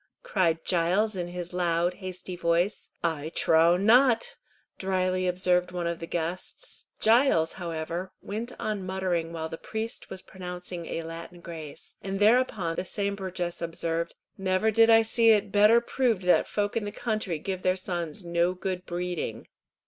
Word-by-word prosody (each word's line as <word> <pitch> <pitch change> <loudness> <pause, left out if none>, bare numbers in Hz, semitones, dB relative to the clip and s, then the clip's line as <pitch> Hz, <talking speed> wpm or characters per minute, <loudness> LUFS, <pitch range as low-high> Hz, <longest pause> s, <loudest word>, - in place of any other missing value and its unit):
cried 165 -4 +1
Giles, 185 +5 +2
in 175 -2 -3
his 175 0 -6
loud, 175 0 +1
hasty 185 -1 -7
voice. 175 +3 0
"I 160 -2 -1
trow 165 +2 +5
not," 230 +4 +4 0.4
dryly 185 -1 0
observed 180 0 +1
one 175 -1 -3
of 170 0 -2
the 165 - -6
guests. 175 - -4
Giles, 220 - +4
however, 170 +1 -4
went 225 +4 -5
on 210 -3 -2
muttering 185 -3 -1
while 160 -1 -4
the 165 0 -7
priest 220 +2 -4
was 190 0 -7
pronouncing 180 -2 -6
a 165 - -3
Latin 165 +2 -8
grace, 160 -4 -9
and 195 0 -3
thereupon 210 -6 +3
the - - 0
same 200 +2 -2
burgess 185 -3 -4
observed, 165 0 -2 0.2
"Never 190 +3 +2
did 225 +1 +5
I 225 0 +7
see 230 +1 +4
it 210 -2 +4
better 210 +3 +6
proved 235 -4 0
that 180 - +4
folk 205 -1 -1
in 225 -2 0
the 205 - -4
country 215 -6 -2
give 185 +4 -4
their 185 0 +2
sons 175 -2 -4
no 170 +1 +1
good 185 0 -4
breeding." 175 -9 -3
180 Hz, 160 wpm, -27 LUFS, 170-205 Hz, 0.4 s, I